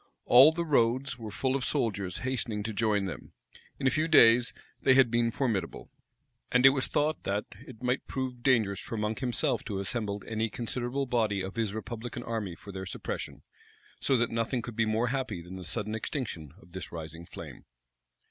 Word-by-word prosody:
All 130 +6 +8
the 170 +1 -2
roads 125 -2 +1
were 110 -2 -6
full 130 +5 -1
of 135 - -1
soldiers 100 -8 -1
hastening 115 -5 -2
to 110 +1 -3
join 105 -2 +1
them. 95 - -7 0.4
In - - -4
a 130 - +5
few 155 +4 +1
days, 120 -6 +7 0.3
they 130 - +5
had 130 -3 +5
been 115 0 +2
formidable. 110 -8 -2 0.6
And 125 +1 +4
it 135 - +10
was 135 -1 0
thought, 150 +1 0
that 100 +2 -1 0.2
it 125 -2 -12
might 125 +2 0
prove 130 -2 -4
dangerous 110 -7 +2
for 115 - -5
Monk 105 +1 -1
himself 125 -3 0
to 105 - -4
have 95 - -1
assembled 100 -1 -3
any 110 0 -1
considerable 120 +4 -2
body 110 -6 +1
of 95 +1 -5
his 110 -3 -1
republican 120 +3 -5
army 110 -7 -3
for 100 - -11
their 95 -1 -6
suppression: - - -5 0.6
so 135 - +2
that 120 0 +1
nothing 115 +1 -1
could 120 -1 -7
be 115 0 +2
more 110 +2 +1
happy 125 -7 -2
than 90 +2 -9
the 95 -1 -8
sudden 105 +7 -3
extinction 105 - -4
of 85 - -19
this 95 +1 -7
rising 80 0 -7
flame. - - -10
115 Hz, 195 wpm, -29 LUFS, 100-125 Hz, 0.6 s, it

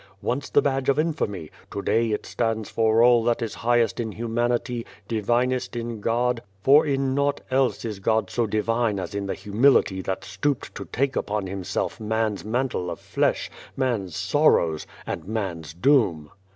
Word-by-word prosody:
Once 125 +7 -2
the - - +4
badge 135 -1 0
of 140 - +3
infamy, 145 - -1 0.2
to - - -5
day 115 0 +2
it 105 - -2
stands 115 -2 -2
for 115 0 +3
all 120 -1 +6
that 120 0 +1
is 115 - -4
highest 120 -1 +1
in 115 -2 -2
humanity, 120 +1 -1 0.2
divinest 120 +3 0
in 115 -1 -4
God, 120 +2 +1 0.2
for 145 +3 +6
in 135 -1 +1
naught 140 +1 +1
else 130 -2 +1
is 105 -3 -4
God 110 +3 +1
so 120 -2 0
divine 110 0 0
as 95 - -5
in 100 -1 -3
the - - -2
humility 105 -3 +3
that 95 0 -3
stooped 100 +9 -2
to - - -7
take 135 +2 -1
upon 105 -1 -1
Himself 95 -1 -3
man's 110 -2 -1
mantle 120 -5 -1
of - - -5
flesh, - - 0 0.3
man's 115 - -1
sorrows, 80 -2 +2 0.2
and - - -5
man's 95 -8 -3
doom." 90 - +2
115 Hz, 165 wpm, -24 LUFS, 100-125 Hz, 0.3 s, all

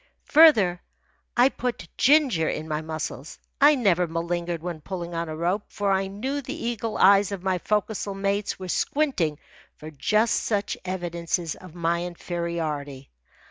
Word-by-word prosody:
Further, 220 - +6 0.6
I 245 +2 +6
put 250 -3 -4
ginger 260 - +4
in 155 - -4
my 155 0 -2
muscles. 155 -2 -6 0.2
I 295 +1 +7
never 185 -8 +2
malingered 170 0 -3
when 170 -3 -5
pulling 175 0 -6
on 165 -1 -3
a 155 - -4
rope, 180 +5 -1
for 200 -1 -1
I 195 0 +1
knew 260 +9 -3
the 275 +4 -6
eagle 230 -5 -3
eyes 200 +1 +5
of 195 -3 -5
my 190 -1 0
forecastle 210 0 -1
mates 200 +1 -1
were 185 - -7
squinting 180 - 0 0.4
for 155 +1 -10
just 215 +10 +1
such 205 -2 -1
evidences 170 -2 -2
of 180 -3 -13
my 170 0 0
inferiority. 165 -6 -4
180 Hz, 150 wpm, -25 LUFS, 170-210 Hz, 0.6 s, I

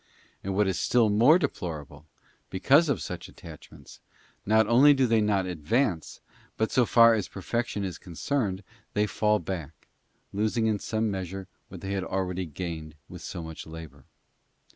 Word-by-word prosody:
And 95 0 -3
what 105 0 +3
is 95 - -1
still 115 -4 +3
more 120 +11 +6
deplorable, 80 - -5 0.4
because 140 - +4
of 140 - 0
such - - -6
attachments, - - -13 0.5
not 110 +1 +4
only 135 +6 +6
do 135 -1 +3
they 115 -2 +3
not 100 -3 +1
advance, 90 - -1 0.4
but, 110 - 0
so 125 -3 +3
far 115 -1 +7
as 105 -3 -1
perfection 105 +1 -3
is 95 -3 -5
con 90 - -12
cerned, 105 - -1 0.3
they 105 +1 +3
fall 105 0 +1
back, 85 -5 -6 0.5
losing 110 +3 0
in 110 -2 +1
some 110 +1 -1
measure 95 0 -5 0.2
what - - -10
they 95 - -5
had 95 -1 -1
already 95 -1 -2
gained 80 -1 -6
with - - -10
so 85 - -6
much 80 -1 -8
labour. 80 -4 -10
100 Hz, 165 wpm, -27 LUFS, 90-115 Hz, 0.5 s, far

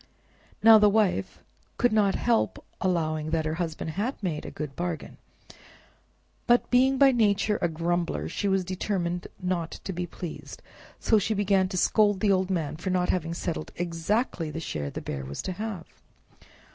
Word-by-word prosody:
Now 225 -1 +9
the 210 0 +6
wife 200 - 0 0.3
could 245 -2 +2
not 205 -3 +3
help 235 -2 0 0.2
allowing 155 -4 0
that 160 -1 0
her 155 - -1
husband 160 -1 -3
had 215 - -2
made 160 -5 -2
a - - -4
good 150 -3 -6
bargain, 175 -2 -4 1.3
but 240 0 +3
being 260 +2 +4
by 275 0 +6
nature 210 -3 +2
a - - +3
grumbler, 165 - -1
she 200 - -2
was 190 -1 +1
determined 180 -2 -2
not 180 -2 -1
to 190 - -4
be 175 0 -3
pleased, 170 0 -8 0.4
so 220 - +3
she 215 +2 -1
began 195 -2 +2
to 185 - -3
scold 205 +1 +3
the 205 0 +3
old 190 -1 +1
man 160 -5 -2
for 175 +3 -4
not 180 -1 +1
having 165 -2 -1
settled 170 -2 -4
exactly 170 +1 -1
the 160 - -5
share 75 - -4
the - - -6
Bear 70 -1 -5
was 70 +2 -6
to - - -3
have. 200 -3 -5
180 Hz, 170 wpm, -27 LUFS, 165-205 Hz, 1.3 s, Now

